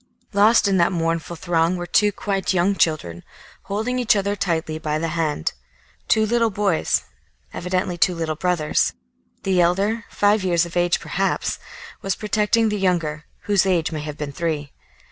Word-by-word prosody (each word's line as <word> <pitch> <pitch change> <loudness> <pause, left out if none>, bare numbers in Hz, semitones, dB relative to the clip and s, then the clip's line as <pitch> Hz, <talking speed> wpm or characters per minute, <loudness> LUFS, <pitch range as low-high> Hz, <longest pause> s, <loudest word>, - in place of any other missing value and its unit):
Lost 210 +2 +5
in 195 -1 +2
that 170 0 +3
mournful 165 -1 -2
throng 170 +1 +1
were 175 - -4
two 205 +4 +3
quite 195 -1 -2
young 185 +3 +3
children, 90 - 0 0.4
holding 220 +6 -2
each 240 -3 +3
other 200 0 0
tightly 160 -5 -2
by 155 -1 -1
the 165 +1 -2
hand, 155 - -1 0.5
two 220 0 +3
little 230 +1 +2
boys, 200 -5 +1 0.5
evidently 180 0 -2
two 180 +1 +3
little 165 -1 -2
brothers. 155 -2 0 0.5
The 185 -2 +2
elder, 200 +6 +1
five 205 0 +2
years 175 -2 +2
of 170 - -10
age 175 0 +2
perhaps, - - -1 0.4
was 195 -1 -1
protecting 215 +1 +1
the 210 -1 -2
younger, 165 -5 0 0.2
whose 205 -3 +3
age 175 -3 +1
may 155 -2 -4
have 150 0 -6
been 150 -1 -4
three. 150 -2 -3
180 Hz, 165 wpm, -22 LUFS, 165-200 Hz, 0.5 s, Lost